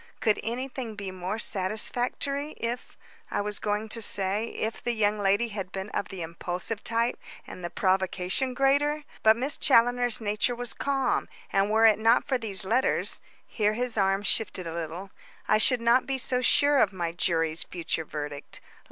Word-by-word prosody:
Could 215 -3 +2
anything 245 -1 -4
be 200 -2 -5
more 185 +3 -4
satisfactory 245 +9 0
if 235 +2 -5 0.3
I - - -1
was 210 0 -4
going 210 +1 -1
to 230 +1 -1
say, 200 +1 +1
if 220 0 -4
the 240 - 0
young 210 -1 +1
lady 205 +4 +2
had 195 -3 -5
been 190 +2 -5
of 200 - -3
the 190 -4 -6
impulsive 175 +6 -4
type 230 +1 0 0.3
and 180 - -10
the 175 - -3
provocation 190 +5 0
greater. 285 +3 +2 0.2
But 220 +1 +5
Miss 270 +4 -2
Challoner's 245 -2 +3
nature 215 +3 0
was 245 0 -4
calm, 275 -1 0 0.2
and 195 +1 +3
were 220 +1 +4
it 220 -2 +6
not 225 +2 +4
for 260 -2 0
these 205 -4 -1
letters 240 +6 +2
" - - -31
here 210 -2 0
his 245 +1 -2
arm 195 -1 +2
shifted 195 -3 -1
a 165 - -5
little 170 +3 -5 0.4
"I 215 - +4
should 245 +2 +4
not 235 +2 +3
be 270 -1 0
so 250 -1 0
sure 285 +3 +4
of 205 - +4
my 175 -3 -3
jury's 165 -2 0
future 165 -2 -3
verdict. 145 -2 -6
215 Hz, 180 wpm, -27 LUFS, 190-245 Hz, 0.4 s, it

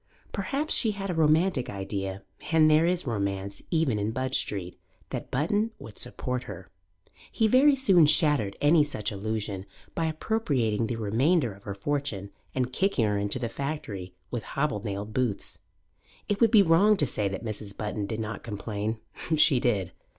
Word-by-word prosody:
Perhaps 275 +10 -1
she 220 -3 +1
had 195 -1 -4
a - - -1
romantic 160 -2 +2
idea 95 -1 -4 0.3
and 155 -1 +5
there 155 +2 +5
is 180 0 +1
romance 100 -4 -3
even 160 -10 +1
in 105 +1 -1
Budge 130 +3 -2
Street 90 -3 -2 0.4
that - - -4
Button 205 - +1
would 110 - -9
support 125 0 -2
her. 95 -2 -9 0.6
He 220 - +2
very 270 +5 +6
soon 190 - +5
shattered 145 - +3
any 150 +1 +5
such 110 -8 -3
illusion 100 -1 -3 0.3
by 165 - -1
appropriating 140 - 0
the 120 - -2
remainder 120 - +1
of 100 +1 -18
her 100 -2 -4
fortune 100 -4 -2 0.2
and 130 -1 -1
kicking 190 - +2
her 105 -1 +1
into 100 +3 -1
the 120 -2 -2
factory 115 - -5 0.2
with 120 - -2
hobnailed 105 -7 -3
boots. 125 -5 -1 0.7
It 205 +1 -1
would 230 - +6
be 215 -2 +7
wrong 195 +5 +5
to 145 - +3
say 105 -5 -1
that 95 +4 -5
Mrs. 105 -2 -5
Button 105 -1 -3
did 110 +1 -3
not 110 -1 -4
complain; 105 0 -3 0.4
she 150 -4 +5
did. 100 -8 0
120 Hz, 165 wpm, -27 LUFS, 100-160 Hz, 0.7 s, be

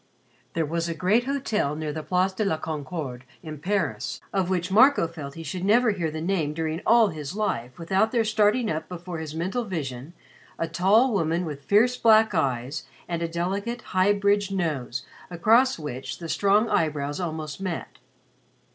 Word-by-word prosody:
There 165 -1 0
was 170 +2 -2
a 165 - -3
great 205 +9 +2
hotel 225 - -1
near 155 -1 -3
the 155 - -4
Place 185 +3 +1
de 215 - -1
la 180 -6 0
Concorde 150 -4 -5 0.2
in 155 -3 -7
Paris, 200 +6 -2
of 190 -2 0
which 185 0 -1
Marco 255 -2 +5
felt 150 -4 -8
he 165 - -7
should 175 +4 -5
never 225 +4 +4
hear 175 -5 -2
the 155 +1 -5
name 165 -4 -1
during 160 +1 -2
all 230 -2 +6
his 155 0 -6
life 125 - -2
without 190 +6 +1
there 235 -2 +2
starting 215 +2 +2
up 155 0 -4
before 175 -1 -6
his 155 -1 -6
mental 190 +9 -1
vision 150 - -5 0.4
a 165 - -1
tall 205 +9 +3
woman 170 -2 0
with 145 -3 -7
fierce 235 +5 +4
black 220 -1 +5
eyes 130 -1 -1 0.2
and 170 -1 -3
a 170 - 0
delicate 195 +8 -3
high 185 +2 +4
bridged 205 0 +2
nose 145 -9 -2 0.2
across 225 +9 +3
which 135 -5 -6
the 170 - -7
strong 205 +6 +3
eyebrows 145 -6 0
almost 160 -2 -4
met. 180 -4 -5
175 Hz, 175 wpm, -25 LUFS, 155-205 Hz, 0.4 s, all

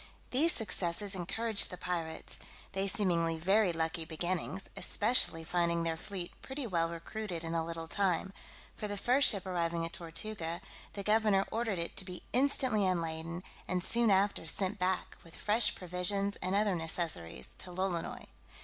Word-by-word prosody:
These 305 +7 +5
successes 200 - +2
encouraged 205 +4 +1
the 180 - -7
pirates, 165 -3 -4 0.3
they 195 0 -1
seeming 170 -4 +1
very 195 +3 +3
lucky 165 0 -1
beginnings, 175 +4 -1
especially 205 -7 +4
finding 170 0 0
their 165 -1 0
fleet 180 +1 -6
pretty 270 0 -5
well 170 -6 0
recruited 170 +1 -5
in 165 0 -4
a 165 -1 +1
little 165 0 -5
time: 190 0 0 0.4
for 210 - -4
the 205 0 -4
first 255 +6 +5
ship 200 -4 +1
arriving 170 -2 -1
at 165 - -7
Tortuga, 170 0 -4 0.3
the 200 - -5
governor 210 -2 +3
ordered 225 -3 -1
it 170 0 -2
to 190 - +2
be 180 -1 -7
instantly 255 -4 +4
unladen, 170 -1 -1 0.2
and 180 -1 -1
soon 235 +2 +3
after 195 -3 +2
sent 195 +4 0
back, 185 0 -1
with 165 - -14
fresh 215 +2 +3
provisions, 185 +3 0
and 185 +2 -2
other 205 -1 +3
necessaries, 160 - -2
to 185 - -3
Lolonois. 180 -1 -3
180 Hz, 160 wpm, -32 LUFS, 165-205 Hz, 0.4 s, These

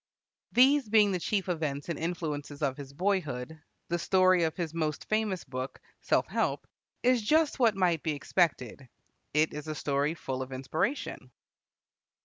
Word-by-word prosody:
These 265 0 +5
being 210 -2 +5
the 185 - -1
chief 195 +2 -1
events 155 -5 -2
and 170 -3 -3
influences 155 -4 -4
of 135 -2 +1
his 140 -1 -9
boyhood, 160 -4 -2 0.3
the 175 0 0
story 185 -1 +4
of 160 - -3
his 165 -3 -3
most 155 -3 -2
famous 215 -5 0
book, 130 0 -6 0.2
"Self - - +2
Help," - - -1 0.4
is 250 -1 +4
just 305 +6 +2
what 230 -5 +4
might 175 -5 +2
be 155 - -1
expected. 140 - -1 0.5
It 155 +1 +3
is 150 +1 -6
a 155 - -3
story 145 +2 0
full 130 -4 -4
of 130 0 -6
inspiration. 155 - -2
165 Hz, 155 wpm, -29 LUFS, 145-195 Hz, 0.5 s, These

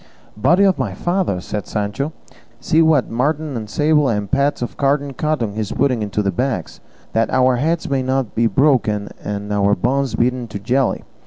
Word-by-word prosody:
"Body 165 - +3
of 195 -2 +3
my - - -2
father!" 175 - -1
said 100 +3 -5
Sancho, 105 +8 -2 0.5
"see 160 - +2
what 155 -6 +3
marten 145 +4 -1
and 110 -2 -5
sable, 150 +1 +2
and 105 -3 -2
pads 140 -2 +1
of 120 - -5
carded 140 0 0
cotton 145 -9 -1
he 110 - -5
is 105 -1 -3
putting 130 -4 +1
into 105 0 -1
the 100 - +1
bags, 125 -3 -3 0.3
that 115 0 +1
our 130 -1 +3
heads 160 +6 0
may 135 -1 0
not 130 -3 -1
be 115 +1 +2
broken 115 -7 +2
and 105 0 -4
our 100 0 +3
bones 135 +6 0
beaten 125 0 0
to 110 - -6
jelly! 125 +6 0
125 Hz, 185 wpm, -19 LUFS, 105-145 Hz, 0.5 s, Body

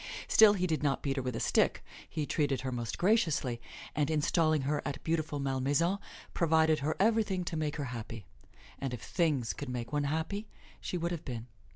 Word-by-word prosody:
Still 220 -2 +7
he 185 -3 0
did 160 -3 0
not 140 -2 0
beat 140 -1 -1
her - - +1
with 125 -2 -3
a - - -2
stick; - - +2 0.3
he 155 -2 -2
treated 145 -3 0
her 130 0 -3
most 120 -2 -3
graciously, 160 - +2 0.3
and 150 0 +1
installing 155 -1 +2
her 145 +2 0
at 140 -1 -4
beautiful 160 -2 -1
Malmaison, 140 +7 +1 0.3
provided 160 -2 +3
her 150 +3 -1
everything 210 -3 +2
to 170 - -4
make 155 -2 -1
her 145 - -3
happy. 115 -3 -7 0.5
And 135 -3 -2
if 120 - -11
"things" 150 -9 0
could 145 - -6
make 125 +1 -4
one 145 -1 +1
happy, 160 +8 -2 0.3
she 180 - -3
would 170 0 -1
have 170 -3 -4
been. 120 -4 -5
150 Hz, 195 wpm, -31 LUFS, 135-170 Hz, 0.5 s, Still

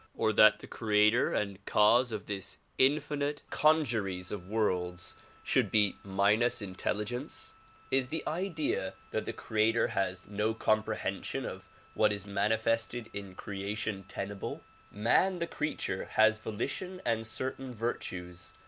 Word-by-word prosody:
Or 110 - +1
that 110 +1 +7
the - - -11
creator 105 +1 +3
and 100 -1 -2
cause 120 +4 +5
of 105 -2 -4
this 100 -3 -4 0.2
infinite 145 +1 +2
congeries 110 - +2
of 95 -3 -5
worlds 90 -4 -1 0.3
should - - +2
be 105 -3 +3
minus 100 +5 +3
intel 95 -1 -2
ligence? 120 +3 -4 0.4
Is 135 -1 +3
the 155 +3 -2
idea 155 - -1 0.2
that - - -1
the - - -2
creator 110 +1 +1
has 95 -1 -2
no 105 +2 0
comprehension 110 -1 -1
of - - -7 0.2
what - - +3
is 100 -1 -4
manifested 110 +2 0
in 100 -2 -7
creation, 100 +1 -4
tenable? 100 +1 -5 0.3
IMan 180 - +3
the 170 - -1
creature 150 - -3
has 110 0 +5
volition 130 - -4
and 115 -1 0
certain 130 +3 -4
virtues. 90 -7 -5
110 Hz, 130 wpm, -31 LUFS, 100-120 Hz, 0.4 s, that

